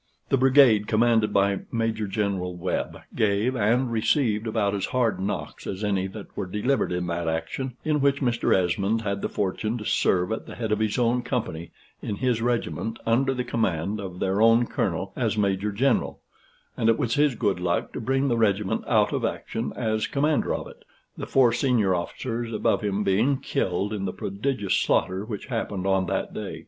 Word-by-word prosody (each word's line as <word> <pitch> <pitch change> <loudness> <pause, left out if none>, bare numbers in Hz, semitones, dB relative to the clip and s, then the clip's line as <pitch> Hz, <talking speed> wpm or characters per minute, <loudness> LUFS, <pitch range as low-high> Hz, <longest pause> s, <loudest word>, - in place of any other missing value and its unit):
The 135 - +3
brigade 130 -5 +5
commanded 115 -1 +3
by 100 0 +2
Major 115 -2 -1
General 95 -3 -2
Webb 90 +1 -3
gave 110 +4 +1
and 120 +3 +2
received 115 -1 +1
about 110 -2 0
as 100 -2 -1
hard 125 -5 0
knocks 100 +2 -4
as 95 +2 -4
any 100 -2 0
that 100 +1 -10
were - - -3
delivered 105 +8 0
in 90 0 -1
that 85 -1 -2
action, 115 +11 -3
in 150 -2 +1
which 140 0 +2
Mr. 120 -3 0
Esmond 95 +4 +2
had 100 -1 -2
the - - -2
fortune 105 +4 -2
to 105 - -7
serve 90 0 +1
at 110 - -4
the - - -8
head 110 -3 -3
of 105 - +1
his 110 +1 0
own 120 0 +2
company 85 -9 -3 0.3
in 105 - -3
his 120 +1 0
regiment, 115 -1 -1
under 130 +4 +2
the 125 -1 -2
command 105 -4 -1
of 95 -3 -6
their 95 +2 0
own 115 +1 +5
Colonel 95 -6 -2
as 110 -4 -1
Major 100 0 +1
General; 125 +6 +1 0.6
and 115 - +1
it 115 - +4
was 115 -2 0
his 145 -3 +3
good 100 -6 0
luck 90 -1 -1
to - - -4
bring 135 +4 +1
the 120 -3 +1
regiment 105 -3 +1
out - - +3
of - - -1
action 115 +2 -3
as 110 -2 -1
commander 150 +1 +1
of - - -5
it, - - -15 0.3
the - - -6
four 125 -3 +4
senior 120 -7 +2
officers 115 +6 -3
above 110 - +1
him 105 0 -1
being 110 +9 +2
killed 95 -2 -1
in 100 -2 -3
the 95 - -3
prodigious 105 0 -2
slaughter 95 +2 +1
which 105 -2 -6
happened 105 -6 -3
on 95 -1 +2
that - - -2
day. - - -5
110 Hz, 190 wpm, -25 LUFS, 100-120 Hz, 0.6 s, brigade